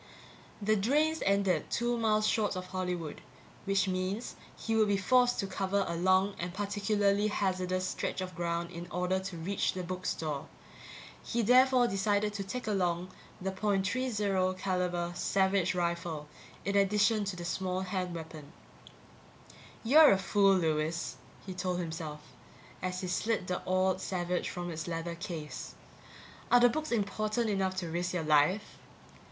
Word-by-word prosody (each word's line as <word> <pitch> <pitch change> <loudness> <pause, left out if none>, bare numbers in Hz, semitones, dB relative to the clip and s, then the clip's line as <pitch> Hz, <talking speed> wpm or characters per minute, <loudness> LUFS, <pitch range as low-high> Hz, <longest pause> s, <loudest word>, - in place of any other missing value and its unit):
The 215 +1 +3
drains 300 +10 +2
ended 195 -2 +2
two 240 0 0
miles 215 -2 +2
short 215 -2 +1
of 185 0 -4
Hollywood 180 -4 -4 0.4
which 195 -1 +2
means 185 +5 -2 0.2
he 225 - -2
would 220 -1 +4
be 200 -1 +2
forced 245 +4 +3
to - - -2
cover 195 +1 -1
a 170 - -2
long 185 +3 +3
and 175 +1 -3
particularly 205 0 +1
hazardous 185 -2 -1
stretch - - -3
of 185 0 -4
ground 170 -1 -2
in 170 +1 -7
order 180 +1 0
to 190 -2 -6
reach 185 +5 -1
the 185 - -4
book 185 +1 -4
store. 155 -2 -3 0.7
He 235 0 -1
therefore 250 +2 +5
decided 205 +1 +1
to 200 -1 -3
take 250 +6 -5
along 180 -3 0 0.3
the 190 +1 -2
.30 200 -1 0
caliber 180 -2 -1
Savage 190 0 +1
rifle 170 -3 -2 0.4
in 200 +1 0
addition 210 +2 +3
to 195 -1 -3
the 175 -1 -6
small 185 +1 -2
hand 185 -2 -3
weapon. 160 -2 -9 1.3
You're 295 +6 +8
a - - +2
fool, 195 +1 +3
Lewis, 160 -1 -1 0.3
he 190 - -5
told 180 -1 -2
himself, 160 -3 -5 0.6
as 180 0 -3
he 185 - -3
slid 215 +2 0
the 180 0 -2
oiled 185 0 +2
Savage 180 -1 -2
from 175 -1 -5
its 160 0 -5
leather 170 0 -3
case. 170 -3 -6 0.8
Are 245 - +8
the 245 0 +6
books 310 +5 -3
important 215 +1 0
enough 190 -1 0
to 185 -2 -3
risk 175 +2 -2
your 170 - -1
life? 155 +7 +2
190 Hz, 155 wpm, -31 LUFS, 175-205 Hz, 1.3 s, You're